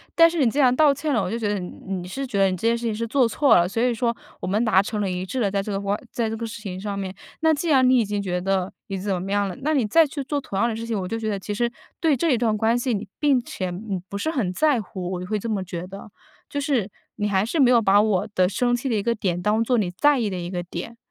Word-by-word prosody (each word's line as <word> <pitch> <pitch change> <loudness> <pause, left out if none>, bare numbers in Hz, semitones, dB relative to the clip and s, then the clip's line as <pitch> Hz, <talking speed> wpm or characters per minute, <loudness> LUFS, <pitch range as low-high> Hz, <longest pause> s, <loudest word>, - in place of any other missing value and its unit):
但 330 0 +8
是 335 0 -3
你 235 - +4
既 270 - -5
然 255 -3 +5
道 300 +1 +5
歉 285 +2 -2
了， 225 - +2
我 180 - -2
就 230 - -2
觉 220 -3 -2
得 205 -1 0
你 180 -1 -6 0.2
你 185 -2 -4
是 270 +9 -4
觉 230 -6 -2
得 195 -1 +5
你 185 - -2
这 225 - -1
件 230 - +3
事 235 0 -5
情 220 - 0
是 230 +2 -2
做 255 +1 +3
错 270 +1 +4
了， 175 0 +4
所 210 +5 -2
以 245 0 +2
说， 235 +1 0 0.3
我 - - -3
们 210 +5 +1
达 205 -4 +5
成 210 +1 -4
了 200 - 0
一 180 0 -3
致 255 +7 -4
了， 205 -5 +2
在 200 0 0
这 210 - -5
个 195 - -1
话 200 0 -1 0.2
在 230 -2 -1
这 220 - -3
个 230 - -4
事 225 - -8
情 190 -3 -6
上 200 -1 -4
面。 190 -1 -4 0.3
那 320 0 +4
既 315 +3 -2
然 260 -4 +5
你 255 0 +5
已 - - +3
经 205 0 -2
觉 180 -3 -2
得 190 0 -1
你 195 - -3
怎 190 -2 -2
么 195 +2 -5
样 205 0 +1
了， 185 - -5
那 310 +3 +1
你 255 -6 +2
再 320 +9 +4
去 280 -1 -5
做 285 +2 -2
同 200 - -6
样 235 - +3
的 230 - -2
事 230 +1 -5
情， 220 -4 -1
我 185 - -3
就 225 +4 -3
觉 220 -1 -2
得 200 - -1
其 205 +2 -5
实 235 +3 0 0.3
对 315 -5 +2
这 325 +5 +1
一 250 - +3
段 220 -2 +1
关 225 +3 +2
系 245 +1 -1
你 205 +1 -5
并 285 -4 +3
且 190 -6 -4
你 190 +1 -4
不 200 - -4
是 315 +10 -1
很 240 - -1
在 280 +4 +2
乎， 185 -2 -6
我 180 - -3
就 180 - -6
会 215 +1 0
这 230 - -5
么 200 -3 -1
觉 175 -1 -6
得。 195 +3 -10 0.4
就 285 - -3
是 270 -8 0 0.3
你 210 0 -1
还 195 0 +2
是 310 +8 -2
没 260 -3 +6
有 245 -2 +6
把 205 -2 +5
我 210 -2 +1
的 185 -1 +3
生 245 +4 +1
气 245 +3 -3
的 230 - +1
一 205 - 0
个 235 - +1
点， 185 -6 -1
当 210 +5 +1
作 245 +1 +1
你 195 -5 0
在 290 +10 +3
意 220 -5 -1
的 185 - -3
一 175 0 -5
个 180 -1 -3
点。 180 +6 -7
215 Hz, 355 characters per minute, -23 LUFS, 195-245 Hz, 0.4 s, 但